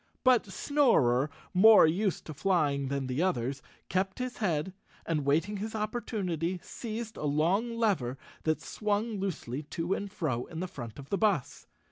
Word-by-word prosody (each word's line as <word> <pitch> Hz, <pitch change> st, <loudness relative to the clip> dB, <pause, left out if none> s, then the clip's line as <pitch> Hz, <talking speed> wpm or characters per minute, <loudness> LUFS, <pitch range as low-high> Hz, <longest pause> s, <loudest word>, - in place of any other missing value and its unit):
But 255 Hz, -4 st, +4 dB
Snorer, 190 Hz, -, +3 dB, 0.2 s
more 215 Hz, +2 st, +8 dB
used 185 Hz, +4 st, 0 dB
to 155 Hz, -, -6 dB
flying 150 Hz, -5 st, +1 dB
than 140 Hz, 0 st, -2 dB
the 130 Hz, +4 st, -1 dB
others, 135 Hz, -6 st, 0 dB, 0.3 s
kept 190 Hz, +1 st, -1 dB
his 250 Hz, -1 st, -4 dB
head 175 Hz, -4 st, -1 dB, 0.3 s
and, 155 Hz, -4 st, -1 dB
waiting 165 Hz, +9 st, +2 dB
his 220 Hz, +3 st, -4 dB
opportunity, 195 Hz, -6 st, -2 dB
seized 225 Hz, -1 st, -6 dB
a -, -, -4 dB
long 185 Hz, +11 st, +1 dB
lever 165 Hz, -, +1 dB, 0.2 s
that 155 Hz, 0 st, 0 dB
swung 210 Hz, 0 st, -1 dB
loosely 150 Hz, -9 st, -3 dB
to 165 Hz, +4 st, -2 dB
and 200 Hz, 0 st, -4 dB
fro 150 Hz, -, -2 dB
in 160 Hz, -, -7 dB
the 185 Hz, -, -2 dB
front 120 Hz, -, -8 dB
of 140 Hz, 0 st, -11 dB
the 200 Hz, -, +1 dB
bus. 200 Hz, -, 0 dB
185 Hz, 160 wpm, -30 LUFS, 145-210 Hz, 0.3 s, more